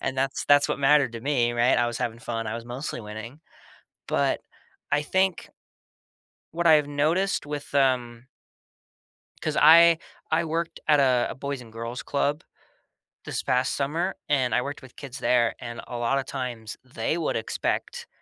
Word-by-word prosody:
And 130 - -3
that's 135 +1 -1
that's 145 0 +5
what - - -1
mattered 140 -2 +4
to 115 - -6
me, 120 -3 +1
right? 120 +1 +3
I 120 - +2
was 120 -1 -3
having 120 -2 -3
fun. 115 -1 -4
I 110 - -3
was 115 0 -6
mostly 120 +2 -5
winning. 110 +6 -9 0.7
But - - +1 0.5
I 145 +1 +3
think 190 +4 0 1.1
what 170 +1 +1
I've 150 -2 +5
noticed 155 +8 0
with 145 -1 -6
um 125 -3 +1 1.2
'cause 155 - -2
I 165 +2 +8 0.3
I 165 +1 +2
worked 165 +1 -3
at 150 -2 +5
a 130 -3 +3
a - - -6
boys 140 0 -4
and 115 -2 -13
girls 115 +2 -5
club 145 +2 -1 0.8
this - - -3
past 125 +1 +1
summer, 165 +7 -1
and 130 -5 +2
I - - +3
worked 145 +3 -6
with 130 -1 -15
kids 135 -1 -8
there. 120 -2 +2
And 120 -1 -7
a 120 - -5
lot 120 +3 +1
of 135 - -4
times, 120 -5 -5
they 125 +4 -2
would 165 - -1
expect, 485 -1 -3
135 Hz, 170 wpm, -26 LUFS, 120-150 Hz, 1.2 s, I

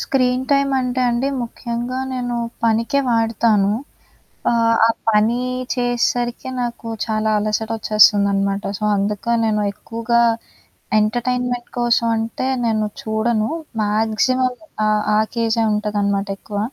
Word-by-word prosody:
Screen 255 -1 +1
time 275 0 +3
అంటే 250 0 -1
అండి 240 +3 0
ముఖ్యంగా 240 +1 -4 0.2
నేను 245 -1 -2 0.3
పనికే 230 +5 +2
వాడతాను. 225 -3 +2 0.8
ఆహ్, 230 -1 +3
ఆ - - +4 0.2
పని 220 +3 +3 0.4
చేసేసరికే 245 0 -1
నాకు 235 -1 -5 0.2
చాలా 220 -1 0
అలసట 215 +1 -1
వచ్చేస్తుందనమాట. 200 -2 +3 0.2
సో, 215 - -4
అందుక 200 +1 -2 0.2
నేను 210 -1 +1
ఎక్కువగా 230 +3 -1 0.8
ఎంటర్టైన్మెంట్ 245 +2 -1
కోసం 240 -1 +2
అంటే 225 +3 -3 0.2
నేను 215 -2 +1 0.2
చూడను. 220 0 0 0.3
మాక్సిమం 220 +5 +1 0.3
ఆహ్, 215 0 +2
ఆ - - +4 0.2
కేజే 230 0 +1
ఉంటదనమాట 205 -1 -1
ఎక్కువ. 205 -1 -6
230 Hz, 110 wpm, -20 LUFS, 215-245 Hz, 0.8 s, ఆ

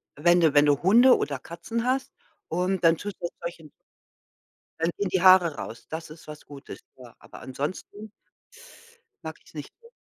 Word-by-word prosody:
wenn 175 +4 +3
du 160 -3 +3
wenn 145 0 +6
du 145 -1 +2
Hunde 235 +8 +6
oder 140 -2 -3
Katzen 225 - -5
hast, 260 +1 -1 0.4
und 180 +2 -2
dann 165 0 +5
tust 205 +2 -7
du 170 - -2
solchen 170 -3 -8 1.1
dann 165 +1 +1
gehen 200 -2 -2
die 185 -1 0
Haare 185 -4 +6
raus. 115 - -9
Das 160 0 -6
ist 155 +1 -14
was 150 0 -11
Gutes. 140 -2 -11 0.2
Ja, 125 -3 -15
aber - - -14
ansonsten 185 +10 -6 1.1
mag - - -7
ich - - -29
es - - -19
nicht - - -9
so. 465 - -17
170 Hz, 180 wpm, -25 LUFS, 150-190 Hz, 1.1 s, wenn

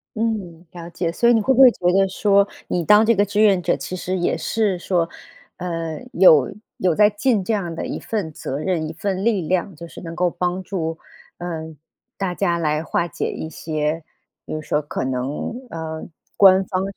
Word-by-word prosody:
嗯， 205 -7 -3
了 170 -1 -9
解。 170 0 -2
所 235 +6 +2
以 - - +6
你 225 - +3
会 265 +6 +2
不 260 - 0
会 260 - +10
觉 180 - -10
得 195 0 +4
说 200 +1 +3 0.2
你 175 - -1
当 210 +6 +6
这 230 +1 +4
个 205 - +3
志 205 +1 0
愿 195 -4 +5
者， - - +1
其 185 - -6
实 185 +1 -3
也 175 - 0
是 210 -5 0
说， 175 -2 0 0.5
呃， 165 -3 -4
有 155 -7 +6 0.3
有 180 -3 +1
在 210 +3 +6
尽 210 -1 +1
这 220 - -1
样 175 -5 -2
的 - - -4
一 - - -4
份 205 -8 -3
责 135 - -5
任、 160 0 -1
一 160 - -6
份 190 +3 -3
力 220 -4 +2
量。 185 +2 -1
就 170 +3 -9
是 - - -11
能 165 -1 -7
够 180 0 +2
帮 180 +2 -2
助， 165 -4 -3 0.4
呃， 160 -2 -6 0.4
大 190 -2 -2
家 170 +1 0
来 155 -1 0
化 170 +1 -1
解 165 - -3
一 160 - -6
些， 155 0 -3 0.4
比 - - -6
如 155 - -3
说 150 0 -1
可 145 -3 -4
能， 130 - -3 0.2
呃， 160 -2 -6 0.3
官 190 -1 +6
方 185 0 -2
180 Hz, 220 characters per minute, -21 LUFS, 160-200 Hz, 0.5 s, 会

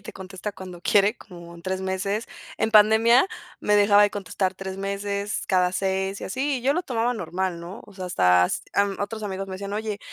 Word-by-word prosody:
y - - -24
te - - -9
contesta 190 +2 -6
cuando 185 -3 -10
quiere 205 +5 +3
como 170 -3 -12
en 170 - -13
3 190 +1 -2
meses. 190 +3 -2 0.3
En 225 - -1
pandemia 225 - +6 0.3
me 210 - +3
dejaba 205 0 +6
de 205 - +4
contestar 190 -1 -2
3, 190 0 -6
meses, 200 +1 -3
cada 180 -1 +2
6, 190 +1 -1
y - - -5
así, 265 +6 -1
y 240 - -11
yo 275 - +3
lo 355 +4 -1
tomaba 245 -4 -1
normal, 180 -3 -3
¿no? 175 +5 -9
O 210 - -16
sea, 185 -1 -6
hasta, 90 - +4 0.3
em, 200 -1 +2
otros 215 +2 -4
amigos 195 -1 -4
me 190 - -8
decían: 200 +1 -6
"Oye, 210 -1 -3
200 Hz, 215 wpm, -24 LUFS, 190-210 Hz, 0.3 s, pandemia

